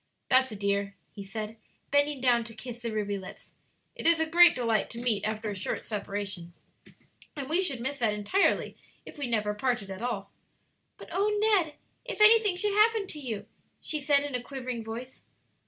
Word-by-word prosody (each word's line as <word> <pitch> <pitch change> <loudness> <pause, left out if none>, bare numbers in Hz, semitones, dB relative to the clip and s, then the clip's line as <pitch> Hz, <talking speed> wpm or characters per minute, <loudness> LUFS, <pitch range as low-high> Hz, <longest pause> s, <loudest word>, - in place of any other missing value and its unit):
"That's 260 -1 +5
a - - -5
dear," 200 0 -1 0.2
he 200 - -8
said, 215 +3 -6 0.3
bending 285 -1 +2
down 240 -2 +4
to 225 -1 -10
kiss 240 +1 -8
the 230 -1 -3
ruby 205 -2 -2
lips. 190 0 -12 0.4
"It - - -2
is 335 -1 +5
a 320 - +2
great 345 +2 +7
delight 230 -3 0
to 230 - -7
meet 225 -4 +1
after 215 0 -2
a - - -5
short 185 - -3
separation, 200 -4 -4 0.8
and 280 -3 -5
we 330 +5 +2
should 280 -10 -2
miss 270 +4 -3
that 225 -3 +3
entirely 210 - +1 0.3
if - - -11
we 280 - -2
never 210 -3 0
parted 215 -3 -1
at 190 +2 -7
all." 220 -5 -3 0.7
"But - - -12
oh, 400 +2 +1
Ned, 395 -8 +2 0.3
if - - -6
anything 425 -2 +6
should 410 +2 0
happen 430 0 +4
to 300 - -4
you!" 235 -7 -5 0.3
she 305 - -3
said, 285 0 +3
in 290 -2 -5
a 250 - -1
quivering 250 -2 -5
voice. 235 +4 -8
245 Hz, 190 wpm, -28 LUFS, 210-295 Hz, 0.8 s, great